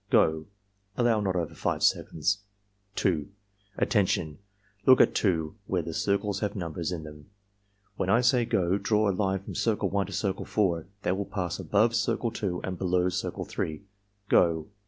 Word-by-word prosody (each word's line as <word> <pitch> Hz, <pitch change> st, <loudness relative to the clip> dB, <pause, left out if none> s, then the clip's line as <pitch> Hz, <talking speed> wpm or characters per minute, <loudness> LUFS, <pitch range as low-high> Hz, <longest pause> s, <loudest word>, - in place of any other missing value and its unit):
— -, -, -43 dB
Go!" 80 Hz, 0 st, +3 dB, 0.5 s
(Allow 120 Hz, -3 st, +3 dB
not 95 Hz, -2 st, -1 dB
over 85 Hz, -3 st, -2 dB
5 -, -, -2 dB
seconds.) 95 Hz, +6 st, +1 dB, 0.6 s
2. 80 Hz, -6 st, 0 dB, 0.5 s
"Attention! 95 Hz, -7 st, +1 dB, 0.5 s
Look 130 Hz, -1 st, +8 dB
at -, -, +5 dB
2, 80 Hz, -6 st, 0 dB
where 90 Hz, -3 st, 0 dB
the 80 Hz, -, -5 dB
circles 100 Hz, +2 st, 0 dB
have 105 Hz, -1 st, -2 dB
numbers 85 Hz, -2 st, -3 dB
in 85 Hz, -3 st, -4 dB
them. 75 Hz, -1 st, -12 dB, 0.7 s
When 95 Hz, -, -1 dB
I 115 Hz, +5 st, +5 dB
say 125 Hz, 0 st, +4 dB
'go' 95 Hz, -1 st, +1 dB
draw 105 Hz, -1 st, +2 dB
a -, -, -3 dB
line 95 Hz, 0 st, -1 dB
from -, -, -7 dB
Circle 110 Hz, -3 st, 0 dB
1 100 Hz, -2 st, 0 dB
to -, -, -9 dB
Circle 95 Hz, -1 st, -2 dB
4 85 Hz, -6 st, 0 dB, 0.2 s
that 95 Hz, -, 0 dB
will 100 Hz, -, -2 dB
pass 90 Hz, -5 st, -3 dB
above 110 Hz, +3 st, +2 dB
Circle 115 Hz, +1 st, 0 dB
2 90 Hz, -5 st, -3 dB
and 90 Hz, -2 st, -4 dB
below 90 Hz, -1 st, +2 dB
Circle 90 Hz, +2 st, -3 dB
3. 80 Hz, +4 st, -4 dB, 0.2 s
— 100 Hz, 0 st, -44 dB
Go!" 80 Hz, 0 st, +3 dB
95 Hz, 180 wpm, -28 LUFS, 85-105 Hz, 0.7 s, Look